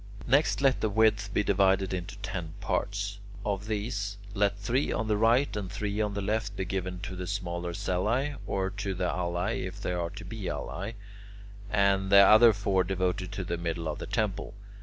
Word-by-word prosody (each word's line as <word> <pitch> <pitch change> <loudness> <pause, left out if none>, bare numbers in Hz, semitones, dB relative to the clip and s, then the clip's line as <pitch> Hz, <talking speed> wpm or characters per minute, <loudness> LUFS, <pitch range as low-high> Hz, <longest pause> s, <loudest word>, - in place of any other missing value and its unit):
Next 140 +2 +3
let 135 -2 +3
the 110 - +1
width 105 -1 +2
be 105 - +1
divided 95 -1 +3
into 95 +2 -5
ten 90 -5 -4
parts. 100 0 -2 0.3
Of 105 0 -2
these, 105 -1 -2 0.2
let 100 -1 +1
three 120 +7 0
on 110 - -1
the 105 - +2
right 115 +6 +3
and 100 -3 -4
three 105 +1 -2
on 105 -1 -1
the 100 - -2
left 105 0 -1
be 95 -1 -2
given 90 -1 -3
to 100 -2 -5
the 90 0 -5
smaller 85 -3 -3
cellae, 115 +13 0
or 95 -1 -1
to 100 -2 -3
the 90 0 0
alae 90 +4 -1
if 95 +2 -6
there 90 -3 -2
are 85 - -2
to 100 +3 -9
be 110 -3 -6
alae, 90 - -4 0.7
and 100 -2 +2
the 100 - +8
other 110 +3 +8
four 100 -2 +1
devoted 95 0 -1
to 95 - -3
the 85 -1 -2
middle 85 -1 -2
of 75 - -3
the - - -6
temple. 105 -1 -2
100 Hz, 195 wpm, -29 LUFS, 95-105 Hz, 0.7 s, the